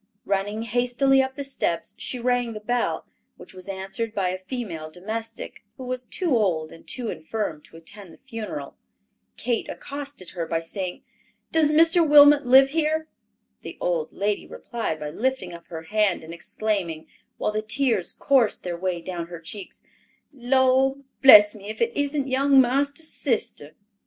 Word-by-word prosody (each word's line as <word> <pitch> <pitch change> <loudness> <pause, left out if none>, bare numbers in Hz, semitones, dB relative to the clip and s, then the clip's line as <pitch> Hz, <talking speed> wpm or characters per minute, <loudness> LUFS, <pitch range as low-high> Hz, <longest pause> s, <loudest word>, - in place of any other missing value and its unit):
Running 205 +3 -1
hastily 245 +4 +2
up 265 0 -3
the 280 - -4
steps, 175 -11 -2
she 255 - -4
rang 245 -1 0
the 215 - -6
bell, 240 +3 -1 0.3
which - - -10
was 185 0 -11
answered 195 +4 -4
by 190 -2 +1
a 185 +1 -3
female 185 -7 -5
domestic, 220 +6 -6
who 260 - -8
was 255 0 -4
too 335 +1 -1
old 170 -8 +1
and 165 - -15
too 245 -3 -4
infirm 160 -2 -4
to 165 - -15
attend 175 +3 -10
the - - -16
funeral. 215 - -6 0.6
Kate 240 -2 -1
accosted 280 -9 -7
her 170 -3 -4
by 165 0 0
saying, 180 +2 -5 0.5
"Does 320 -2 +4
Mr. 325 +3 +5
Wilmot 290 -2 +7
live 265 +2 +7
here?" 315 +1 0 0.5
The - - -9
old 165 -3 -1
lady 205 +1 -2
replied 225 -10 -4
by 150 0 -5
lifting 250 -4 -2
up 170 0 -11
her 160 -1 -7
hand 210 -1 +1
and 160 +1 -9
exclaiming, 175 -3 -3 0.3
while - - -1
the 215 0 -1
tears 225 -3 0
coursed 260 -6 +2
their 175 -1 -3
way 180 -1 -2
down 175 -2 -5
her 170 -1 -8
cheeks, 185 +4 -9 0.5
"Lord 265 +1 +2 0.2
bless 210 -6 +9
me 205 -1 -10
if 220 - -6
it 235 0 0
isn't 285 -1 -1
young 270 +1 +4
marster's 280 +5 +1
sister." 160 - -2
220 Hz, 165 wpm, -24 LUFS, 180-265 Hz, 0.6 s, bless